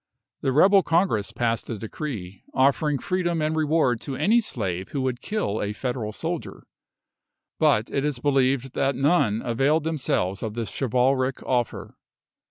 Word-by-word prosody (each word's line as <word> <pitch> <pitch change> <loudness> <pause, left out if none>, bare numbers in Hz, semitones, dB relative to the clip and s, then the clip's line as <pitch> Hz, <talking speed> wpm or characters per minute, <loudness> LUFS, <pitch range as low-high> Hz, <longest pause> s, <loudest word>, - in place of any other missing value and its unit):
The 135 - +1
rebel 195 +8 +6
Congress 165 - +1
passed 115 -1 -1
a 115 - -3
decree, 105 -4 -6
offering 140 +2 +2
freedom 180 -1 -1
and 155 +1 0
reward 150 -6 +2
to 135 - -5
any 225 - +3
slave 95 - -3
who 140 - -3
would 130 -2 -2
kill 205 - -2
a 105 0 -2
Federal 120 -1 -3
soldier; - - -5 1.0
but 105 +2 +3
it 140 - 0
is 150 -3 -1
believed 135 -1 +1
that 135 -1 0
none 135 -6 +2
availed 135 +7 +2
themselves 125 - -1
of 110 -1 -4
this 115 -2 -3
chivalric 130 +1 +1
offer. 120 -3 -2
130 Hz, 150 wpm, -25 LUFS, 115-155 Hz, 1.0 s, rebel